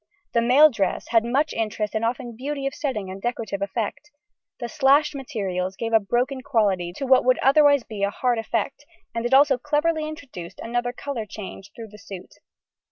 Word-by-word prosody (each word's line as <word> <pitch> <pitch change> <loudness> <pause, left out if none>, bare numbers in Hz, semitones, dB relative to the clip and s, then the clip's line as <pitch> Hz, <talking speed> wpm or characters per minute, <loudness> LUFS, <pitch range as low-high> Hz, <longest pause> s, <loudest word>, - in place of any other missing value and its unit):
The 235 - +3
male 275 +6 +6
dress 200 -6 -2
had 225 -1 +4
much 275 +6 0
interest 215 -1 -2
and 220 0 -1
often 240 0 -2
beauty 275 +3 -4
of 275 - -1
setting 215 - -3
and 195 +1 -8
decorative 220 -4 -3
effect. 220 +8 -3 0.5
The 240 - -3
slashed 290 +2 +3
materials 195 -9 -3
gave 225 +2 -4
a 225 - +7
broken 245 +6 -1
quality 200 -9 +1
to 270 - -4
what 260 -1 +5
would 255 0 +3
otherwise 285 -1 +5
be 215 -3 -8
a 200 - +2
hard 240 +3 0
effect, 225 +5 -2 0.3
and 230 +1 -1
it 250 - -3
also 275 -2 +5
cleverly 305 +3 0
introduced 265 - -9
another 240 +1 -2
colour 245 -3 -5
change 195 -1 -9
through 225 -2 -9
the 210 +1 -14
suit. 190 -3 -10
240 Hz, 185 wpm, -24 LUFS, 210-275 Hz, 0.5 s, a